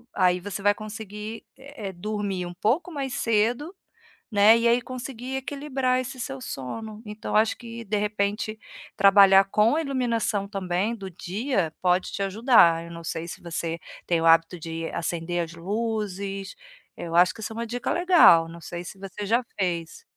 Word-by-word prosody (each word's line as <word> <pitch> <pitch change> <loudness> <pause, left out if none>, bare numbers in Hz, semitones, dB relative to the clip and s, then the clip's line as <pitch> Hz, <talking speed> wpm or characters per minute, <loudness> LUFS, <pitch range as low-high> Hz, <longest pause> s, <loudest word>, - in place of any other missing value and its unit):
aí 180 -2 +3
você 200 +1 -6
vai 205 0 +5
conseguir, 215 +1 -8
é 265 -7 -8
é 190 - -8
dormir 195 -1 -3
um 175 - -9
pouco 300 - 0
mais 275 -4 -4
cedo, 230 +8 +1 0.6
né, 210 +2 +7
e 235 0 +2
aí 240 +1 +4
conseguir 255 +1 -7
equilibrar 265 -2 -1
esse 255 0 -7
seu 135 - -5
sono. 210 - -6
Então 210 +1 -6
acho 215 +1 +3
que 235 -1 -8
de 210 +2 -1
repente 210 +1 -1 0.4
trabalhar 195 -1 +7
com 215 +6 +3
a 325 - +1
iluminação 235 -7 -1
também 195 +2 -1
do 195 -4 -8
dia 190 - -2
pode 180 0 +2
te 200 - -3
ajudar. 195 -5 +4
Eu 170 - -10
não 170 - -8
sei 165 +1 -4
se - - -8
você 170 -1 -3 0.3
tem 170 -2 +1
o 165 - 0
hábito 165 +2 +5
de 165 0 -4
acender 170 +1 -2
as 165 - -11
luzes. 200 0 -3 0.4
Eu 170 0 -4
acho 180 +1 +5
que 225 - -11
isso 220 - -5
é 220 - -9
um - - -3
dica 245 +2 -2
legal. 345 - +6
Não 170 0 -10
sei 175 +3 -7
se 190 - -9
você 195 +1 -6
já 235 +5 +2 0.2
fez. 170 -4 -2
205 Hz, 180 wpm, -25 LUFS, 180-230 Hz, 0.6 s, né